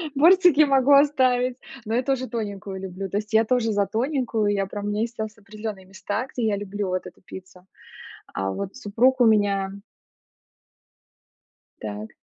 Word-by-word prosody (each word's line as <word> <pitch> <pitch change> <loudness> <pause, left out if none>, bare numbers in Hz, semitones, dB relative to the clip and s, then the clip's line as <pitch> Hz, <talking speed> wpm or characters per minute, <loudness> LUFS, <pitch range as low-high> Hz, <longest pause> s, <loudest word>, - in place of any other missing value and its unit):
Бортики 340 0 +6
могу 275 -1 +4
оставить, 255 -3 +3 0.3
но 220 - -3
я 245 - +2
тоже 260 -1 -1
тоненькую 205 -4 -5
люблю, 190 +1 -6
то - - -3
есть 210 +1 -4
я 220 - +5
тоже 225 -2 +1
за 200 -1 +1
тоненькую, 240 -3 -1
я 195 -1 0
прям 205 +1 -6
у - - -1
меня 210 +1 -1
есть 235 +1 -3
ос 220 0 -4
определённые 210 -2 -8
места, 205 +5 -4
где 235 -3 -1
я 205 - +1
люблю 205 0 -4
вот 185 0 -2
эту 180 - -12
пиццу. 185 0 -12 0.7
А 95 0 -2
вот 195 - -5
супруг 255 +3 +1
у - - +7
меня 200 -3 +2 2.1
Так. 105 0 -7
215 Hz, 165 wpm, -24 LUFS, 195-250 Hz, 2.1 s, у